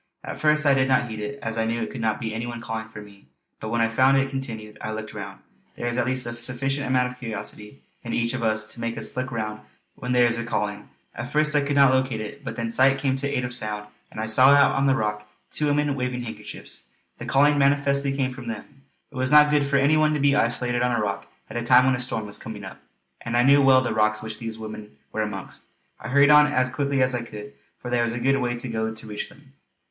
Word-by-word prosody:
At - - -7
first 150 0 +3
I 140 - +6
did 130 -1 +2
not 130 -2 +2
heed 110 - -6
it, 125 +7 -5
as 115 0 -2
I 110 - +1
knew 115 +1 -1
it - - -5
could 125 - -6
not 110 -1 0
be 110 -2 -4
any 115 +2 -4
one 120 -1 -6
calling 110 -1 -5
to 105 - -9
me; 100 -1 -16 0.3
but 110 - -5
when 115 +1 0
I 115 - +4
found 130 +4 +3
it 135 0 0
continued, 115 -6 -6
I 110 - -4
looked 110 0 -6
round. 100 -1 -8 0.3
There - - -5
is 120 0 -1
at 125 0 0
least 130 -1 0
a 120 - -4
sufficient 130 +4 -2
amount 125 -1 +1
of 125 - -14
curiosity 105 +1 -7 0.2
in 115 - -6
each 115 +1 0
of 130 - -3
us 110 -1 0
to - - -12
make 115 0 -3
us - - -5
look 130 +1 -3
round 110 -2 -4 0.3
when 125 - -5
there 125 -1 +5
is 120 0 +2
a - - -2
calling. 105 -3 -3 0.2
At 125 +1 -6
first 150 0 +2
I 145 - +4
could 140 0 -1
not 140 -2 +6
locate 130 -3 0
it; 125 +7 -7
but 115 - -5
then 115 -1 -3
sight 135 +3 +4
came 135 -1 0
to 140 +1 -2
aid 135 -3 -1
of 125 - -5
sound, 105 -3 -4 0.2
and - - -9
I 110 - -1
saw 130 +4 +5
out 140 0 +6
on 135 0 +2
a 135 - +3
rock 105 -2 -3 0.2
two 150 - 0
women 145 0 +1
waving 125 -2 -3
handkerchiefs. 115 - -9 0.4
The - - -7
calling 145 +2 +4
manifestly 140 0 +2
came 135 -2 -1
from 125 -2 -10
them. 115 +4 -8 0.3
It - - -16
was 130 0 0
not 150 0 +7
good 145 -1 +3
for 140 - 0
any 140 +3 +4
one 155 0 +3
to - - -1
be 140 0 +3
isolated 120 -1 +1
on 125 -1 +1
a - - 0
rock 100 -2 -3 0.2
at - - -6
a - - -1
time 125 +1 +5
when 130 - +3
a 125 - -2
storm 125 -3 -2
was 105 0 -4
coming 110 -2 -8
up; 95 - -10 0.4
and 115 +1 -2
I 120 - +4
knew 140 +2 +6
well 135 -1 +6
the 120 - -2
rocks 110 0 +1
which 110 0 -6
these 115 -1 -5
women 110 -6 -9
were 110 - -2
amongst. 105 -2 -6 0.3
I - - -8
hurried 140 +2 +5
on 150 0 +7
as 130 -3 +1
quickly 140 0 +1
as 130 0 +1
I 120 - -1
could, 105 -6 -9 0.2
for 125 - -7
there 120 -1 +2
was 115 0 0
a 120 - -3
good 135 +3 +2
way 120 -1 -1
to 120 - -6
go 110 -1 -2
to 110 - -10
reach 105 -1 -5
them. 135 -1 -20
125 Hz, 270 wpm, -24 LUFS, 110-135 Hz, 0.4 s, not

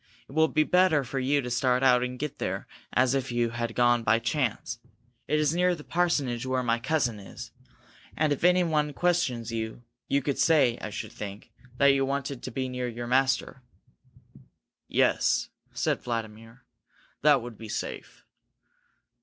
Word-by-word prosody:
It - - -15
will 160 +2 +3
be 155 0 +2
better 180 -4 +3
for 135 +2 -4
you 140 +2 +1
to 125 -1 -5
start 125 +1 +2
out 125 -2 +5
and 125 0 -3
get 150 +2 -5
there - - -3 0.3
as 130 0 +3
if 135 -2 -1
you 120 -1 0
had 120 -1 -3
gone 120 -1 +3
by 115 0 +3
chance. 115 -1 -2 0.5
It 150 - +1
is 150 0 +2
near 180 +1 +2
the 150 - -11
parsonage 145 -10 0
where 130 0 -1
my 115 -1 +1
cousin 125 -4 0
is, 115 +4 -10 0.7
and 155 -2 +2
if 145 - -6
anyone 165 -5 +3
questions 130 -11 0
you, 110 +1 -4 0.2
you 140 -1 +1
could 140 0 -2
say, 145 -8 +4
I 110 - -4
should 105 - -6
think, 100 0 -8 0.3
that 140 +1 +5
you 135 0 +2
wanted 140 -1 -3
to - - -5
be 130 +2 -3
near 125 -1 -3
your 120 0 -5
master." 130 +1 +1 1.3
"Yes," - - +2 0.2
said - - -1
Vladimir. 115 +1 -6 0.6
"That 145 -4 +4
would 120 -3 -9
be 110 -1 -8
safe." - - -6
130 Hz, 170 wpm, -27 LUFS, 120-145 Hz, 1.3 s, out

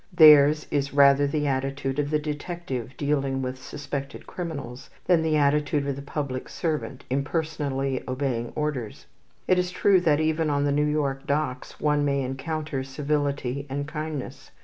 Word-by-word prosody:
Theirs 150 -2 +8
is 140 -1 -1
rather 140 0 +6
the 150 +1 -1
attitude 135 0 -1
of 145 -1 0
the 155 - +2
detective 150 -4 -5
dealing 140 -2 0
with 130 0 -4
suspected 140 0 -6
criminals 145 -8 -6 0.2
than 175 -3 +4
the 160 -1 +1
attitude 145 0 +2
of 140 -1 -1
the 140 - -7
public 140 -2 -4
servant 150 -5 -3
impersonally 140 -2 -1
obeying 130 -3 -2
orders. 145 -8 -3 0.4
It 185 - +4
is 180 0 0
true 185 0 +3
that 155 -4 +3
even 160 0 +1
on 145 -1 +1
the 145 - +1
New 150 +1 +2
York 140 -2 -1
docks 140 -3 -2
one 150 -1 +2
may 140 -1 +1
encounter 135 +2 -3
civility 140 -1 -2
and 145 +2 -3
kindness. 150 -2 -5
145 Hz, 155 wpm, -26 LUFS, 135-150 Hz, 0.4 s, Theirs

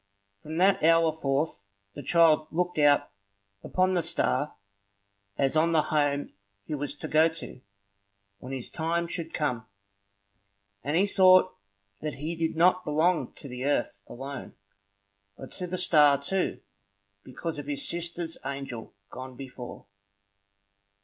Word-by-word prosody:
From 155 +6 -6
that 190 +2 +4
hour 165 0 +5
forth 140 -7 -1 0.3
the - - -7
child 160 0 +4
looked 180 0 -1
out 145 -6 +4 0.5
upon 185 0 +1
the 175 - +2
star 150 -3 0 0.8
as 135 +2 +1
on 165 +2 +3
the 155 -2 +4
home 145 -2 0 0.3
he - - -5
was 145 0 -3
to - - -6
go 155 +1 +5
to, 160 -5 -8 0.8
when 130 - -9
his 130 -3 -5
time 170 +1 -1
should 165 -1 -5
come; 125 -7 -2 1.2
and 145 +5 0
he 195 - +4
thought 185 -2 +5 0.5
that 150 -1 -3
he 155 +5 -4
did 165 -1 -1
not 180 +3 +4
belong 160 +3 +1
to 145 - -8
the 125 -1 -6
earth 120 -8 0
alone, 135 +2 -8 0.8
but 135 - -10
to 180 - -4
the 185 +1 -3
star 150 -6 +5
too, 185 +7 -1 0.6
because 155 +4 -5
of 145 - -7
his 145 -1 -2
sister's 170 -1 -3
angel 135 -6 -6 0.2
gone 130 0 -8
before. 125 -4 -9
155 Hz, 140 wpm, -28 LUFS, 140-170 Hz, 1.2 s, hour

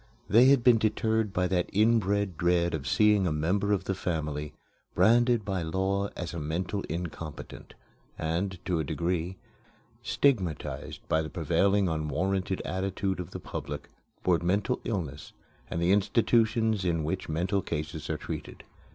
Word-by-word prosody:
They 115 +6 +6
had 135 -2 +5
been 120 -2 +6
deterred 110 0 +1
by 90 -1 0
that 90 -2 0
inbred 100 -3 +2
dread 85 +1 +2
of 70 -4 -3
seeing 105 +4 +4
a - - 0
member 90 +7 0
of 100 -2 +1
the 95 - -1
family 75 -5 -3 0.4
branded 115 +3 +4
by 95 -3 -1
law 95 +4 0
as 85 -2 -4
a 85 - -4
mental 85 +6 -2
incompetent, 80 -2 -6 0.4
and, 90 +4 -2
to 90 -3 0
a - - 0
degree, 85 +4 -2 0.6
stigmatized 95 - -1
by 80 - +2
the 80 - -5
prevailing 100 +5 +2
unwarranted 90 +5 -1
attitude 95 0 -2
of 90 - -5
the - - -7
public 75 +1 -6 0.3
toward 85 -3 +3
mental 100 +8 0
illness 80 - -4 0.4
and 85 - -2
the 85 +2 +2
institutions 110 +1 +2
in 85 -3 0
which 80 +4 -3
mental 90 +5 0
cases 80 -2 -4
are - - -1
treated. - - -7
95 Hz, 150 wpm, -28 LUFS, 80-100 Hz, 0.6 s, They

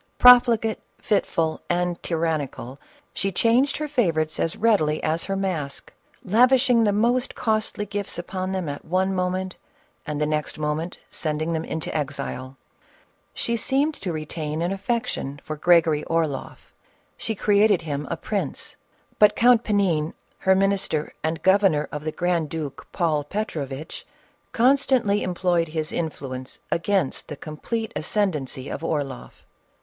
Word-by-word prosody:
Profligate, 240 -3 +6 0.2
fitful 165 -6 0
and 175 0 0
tyrannical, 155 -6 -2 0.3
she 195 +1 -1
changed 235 +8 +2
her 305 - -3
favorites 165 - 0
as 165 - 0
readily 195 -9 +2
as 160 +2 0
her 195 - -2
mask, 170 -8 -3 0.3
lavishing 245 +3 +4
the 210 - +3
most 240 +5 +1
costly 215 -2 -1
gifts 205 0 -4
upon 185 +2 -4
them 185 -3 -2
at 145 0 -5
one 190 +3 0
moment, 185 0 -2 0.5
and 150 -1 -2
the 150 - +2
next 150 0 -2
moment 155 +3 -2
sending 155 +1 -1
them 160 0 -1
into 160 -1 -4
exile. 135 -2 -4 0.8
She 235 - 0
seemed 275 +6 +1
to 190 -10 -5
re 155 -1 -4
tain 155 0 -3
an 175 - 0
affection 195 - -2
for 155 - -5
Gregory 160 -1 +4
Orloff; 160 -5 -2 0.4
she 220 - -3
created 205 -3 +3
him 145 -2 -3
a 170 - -2
prince, 205 +5 -3 0.4
but 210 -1 +6
Count 240 -1 +5
Panin, 180 -8 +1 0.2
her 190 0 +4
minister 195 -5 +1
and 160 +1 -2
governor 190 -7 +4
of 150 0 -6
the 155 - -1
grand 170 -2 0
duke 150 -4 -6
Paul 155 -4 +1
Petrovitch, 150 -5 -5 0.4
constantly 250 -4 +3
employ 180 -1 +1
ed 165 - -3
his 155 0 -3
influence 130 -5 -5
against 185 -3 0
the 150 - -7
complete 220 +10 -4
ascendency 155 -8 -1
of - - -5
Orloff. 145 -6 -4
175 Hz, 140 wpm, -24 LUFS, 155-205 Hz, 0.8 s, Profligate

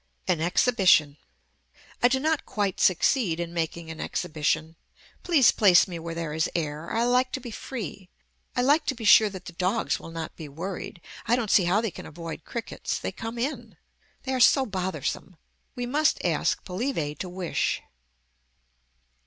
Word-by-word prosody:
AN 160 - +1
EXHIBITION 175 - +3 0.9
I 245 - +7
do 265 +1 +1
not 315 +2 0
quite 200 -3 -2
succeed 185 -1 +2
in 170 0 -4
making 165 0 -3
an 160 - -7
exhibition. 155 +1 -1 0.5
Please 305 -8 +5
place 190 -4 +5
me 175 -3 -6
where 165 0 -6
there 165 -2 -4
is 160 0 0
air. 155 -1 -3
I 230 - +1
like 250 +1 +2
to - - -2
be 245 -2 -8
free. 210 -6 -7 0.5
I 245 - +1
like 290 +5 +3
to 270 - 0
be 230 -2 -7
sure 215 +1 +7
that 190 -2 -9
the 180 - -8
dogs 185 +6 0
will - - -10
not 165 -1 -6
be 155 -3 -8
worried. 175 +3 -6 0.3
I 235 - +4
don't 230 -4 -1
see 185 - +5
how 190 +5 +2
they 225 -4 -2
can - - -9
avoid 165 0 -8
crickets. 235 -1 -4
They - - -4
come 225 +1 -6
in. 235 - -4 0.5
They 265 - -2
are 260 - 0
so 265 +2 +5
bothersome. 190 -2 -3 0.4
We 245 - -3
must 295 +5 +1
ask - - 0
Polybe 180 - -2
to 185 - -4
wish. 180 -1 -2
190 Hz, 175 wpm, -26 LUFS, 165-245 Hz, 0.9 s, I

